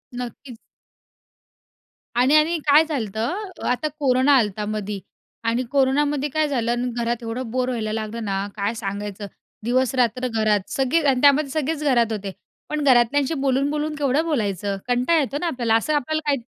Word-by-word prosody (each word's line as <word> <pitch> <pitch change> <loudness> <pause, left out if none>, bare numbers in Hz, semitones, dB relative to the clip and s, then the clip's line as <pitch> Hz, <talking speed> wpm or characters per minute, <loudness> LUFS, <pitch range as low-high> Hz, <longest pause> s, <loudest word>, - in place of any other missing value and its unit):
नक्कीच. 245 +1 -7 1.6
आणि-आणि 305 +7 +4
काय 295 +2 +7
झालतं, 280 - -3 0.2
आता 250 +5 0
कोरोना 265 0 +3
आलंता 210 -3 0
मधी 210 -1 -4 0.4
आणि 230 +2 0
कोरोनामध्ये 285 +1 +1
काय 310 +2 +1
झालं 240 -5 -1
आणि 245 +1 -1
घरात 235 0 -2
एवढं 230 +2 -4
बोर 255 +1 0
व्हायला 220 -4 -2
लागलं 220 +1 -4
ना, 195 0 -2
काय 205 +1 -1
सांगायचं. 205 -1 -5 0.4
दिवस-रात्र 250 0 +1
घरात, 215 -4 0
सगळे 270 +5 +1
आणि 255 -2 +1
त्यामध्ये 285 0 +5
सगळेच 305 +1 -2
घरात 240 -6 +2
होते. 200 -2 -4 0.4
पण 300 -1 -2
घरातल्यांशी 265 +2 +3
बोलून-बोलून 285 +3 0
केवढं 290 +1 +1
बोलायचं? 205 - -1
कंटाळ 250 +7 +2
येतो 280 -1 -1
ना 350 - 0
आपल्याला, 240 -7 +1
असं 265 +7 +1
आपल्याला 310 +2 0
काही 280 -5 0
250 Hz, 150 wpm, -22 LUFS, 225-285 Hz, 1.6 s, काय